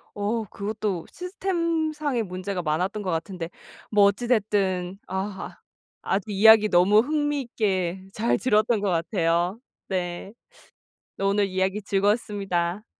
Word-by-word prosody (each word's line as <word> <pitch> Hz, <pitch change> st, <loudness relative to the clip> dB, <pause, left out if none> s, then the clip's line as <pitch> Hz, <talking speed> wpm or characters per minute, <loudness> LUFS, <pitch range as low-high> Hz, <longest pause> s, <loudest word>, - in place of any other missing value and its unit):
어 210 Hz, +3 st, -1 dB
그것도 200 Hz, -3 st, -3 dB
시스템상의 330 Hz, -, -1 dB
문제가 185 Hz, 0 st, -4 dB
많았던 180 Hz, +7 st, -1 dB
것 185 Hz, -, -2 dB
같은데 165 Hz, +1 st, -4 dB, 0.4 s
뭐 205 Hz, -2 st, +6 dB
어찌 200 Hz, +5 st, +1 dB
됐든 195 Hz, -5 st, 0 dB
아 190 Hz, +1 st, -5 dB, 0.4 s
아주 200 Hz, +2 st, -2 dB
이야기 215 Hz, +1 st, +7 dB
너무 190 Hz, +3 st, +5 dB
흥미 295 Hz, +1 st, 0 dB
있게 190 Hz, -7 st, -1 dB
잘 230 Hz, +2 st, +1 dB
들었던 220 Hz, -2 st, +2 dB
것 205 Hz, -, 0 dB
같아요. 175 Hz, +2 st, 0 dB, 0.3 s
네. 180 Hz, +1 st, -3 dB, 0.8 s
네 195 Hz, -, -3 dB
오늘 200 Hz, +1 st, +2 dB
이야기 190 Hz, +2 st, -1 dB
즐거웠습니다. 200 Hz, -2 st, 0 dB
200 Hz, 265 characters per minute, -25 LUFS, 185-220 Hz, 0.8 s, 이야기